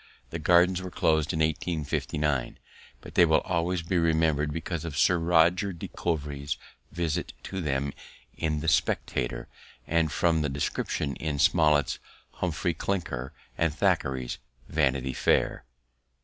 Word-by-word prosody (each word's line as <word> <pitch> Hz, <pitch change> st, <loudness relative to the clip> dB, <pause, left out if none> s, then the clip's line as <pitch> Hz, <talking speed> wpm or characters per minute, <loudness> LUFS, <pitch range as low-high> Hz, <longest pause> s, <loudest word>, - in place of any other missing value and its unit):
The 85 Hz, -, -4 dB
Gardens 90 Hz, +3 st, +4 dB
were 95 Hz, -, -5 dB
closed 80 Hz, -3 st, +1 dB
in 80 Hz, -, -1 dB
1859, 75 Hz, -3 st, -1 dB, 0.4 s
but -, -, -11 dB
they 90 Hz, -, +6 dB
will 80 Hz, -2 st, +4 dB
always 90 Hz, -1 st, -1 dB
be 90 Hz, +1 st, +1 dB
remembered 80 Hz, -2 st, +2 dB
because 85 Hz, +1 st, -4 dB
of 80 Hz, -4 st, -5 dB
Sir 85 Hz, +1 st, +4 dB
Roger 85 Hz, +4 st, +3 dB
de 85 Hz, -, -7 dB
Coverley's 75 Hz, -4 st, -3 dB, 0.3 s
visit 85 Hz, -3 st, -2 dB
to 95 Hz, -1 st, -4 dB
them 70 Hz, -2 st, -1 dB, 0.4 s
in 75 Hz, -2 st, -1 dB
the 80 Hz, -, -4 dB
Spectator -, -, 0 dB, 0.4 s
and 80 Hz, -2 st, +1 dB
from 80 Hz, +1 st, +2 dB
the 75 Hz, -, 0 dB
descriptions 70 Hz, +1 st, -2 dB
in 75 Hz, -2 st, -2 dB
Smollett's 75 Hz, 0 st, +3 dB, 0.4 s
Humphry 85 Hz, 0 st, -1 dB
Clinker 80 Hz, -8 st, -3 dB, 0.3 s
and 85 Hz, -1 st, +3 dB
Thackeray's 65 Hz, -3 st, 0 dB, 0.3 s
Vanity 65 Hz, -3 st, +1 dB
Fair. 60 Hz, -, +1 dB
80 Hz, 135 wpm, -28 LUFS, 75-85 Hz, 0.4 s, they